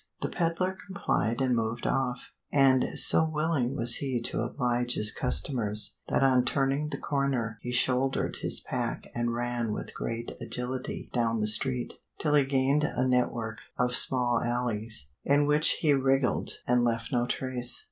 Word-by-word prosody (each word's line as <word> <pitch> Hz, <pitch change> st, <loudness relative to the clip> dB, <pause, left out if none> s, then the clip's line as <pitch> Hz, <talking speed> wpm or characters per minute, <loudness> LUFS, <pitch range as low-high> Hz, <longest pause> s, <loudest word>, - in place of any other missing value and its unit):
The -, -, -2 dB
peddler 175 Hz, +2 st, -2 dB
complied 125 Hz, -, -2 dB
and 130 Hz, -2 st, +1 dB
moved 115 Hz, +1 st, -3 dB
off, 130 Hz, -2 st, -2 dB, 0.2 s
and 135 Hz, -3 st, +3 dB
so -, -, +6 dB
willing 155 Hz, -5 st, -1 dB
was 120 Hz, -3 st, +4 dB
he 130 Hz, -3 st, -2 dB
to -, -, -1 dB
oblige 120 Hz, 0 st, -1 dB
his 105 Hz, -1 st, +5 dB
customers 115 Hz, -4 st, 0 dB
that -, -, +1 dB
on 130 Hz, -2 st, +3 dB
turning 135 Hz, +3 st, -1 dB
the -, -, -5 dB
corner 130 Hz, -6 st, -2 dB
he 125 Hz, -, -5 dB
shouldered 130 Hz, +2 st, 0 dB
his -, -, -1 dB
pack -, -, -4 dB
and 120 Hz, 0 st, -2 dB
ran 120 Hz, -2 st, -3 dB
with -, -, -7 dB
great 115 Hz, 0 st, -5 dB
agility 125 Hz, +1 st, -5 dB
down 115 Hz, -2 st, 0 dB
the 105 Hz, -, 0 dB
street, 125 Hz, +3 st, +3 dB, 0.2 s
till 150 Hz, -2 st, -1 dB
he 145 Hz, -2 st, +4 dB
gained 135 Hz, +2 st, +1 dB
a 130 Hz, -3 st, -1 dB
network 120 Hz, -3 st, -1 dB, 0.2 s
of 125 Hz, 0 st, 0 dB
small 125 Hz, -2 st, +6 dB
alleys 115 Hz, -, -2 dB
in 145 Hz, +1 st, +2 dB
which 150 Hz, +1 st, +2 dB
he 150 Hz, -3 st, +3 dB
wriggled 135 Hz, -1 st, 0 dB, 0.2 s
and 125 Hz, 0 st, +2 dB
left 115 Hz, -1 st, -2 dB
no 120 Hz, -2 st, 0 dB
trace. 125 Hz, -1 st, 0 dB
125 Hz, 160 wpm, -27 LUFS, 120-135 Hz, 0.2 s, so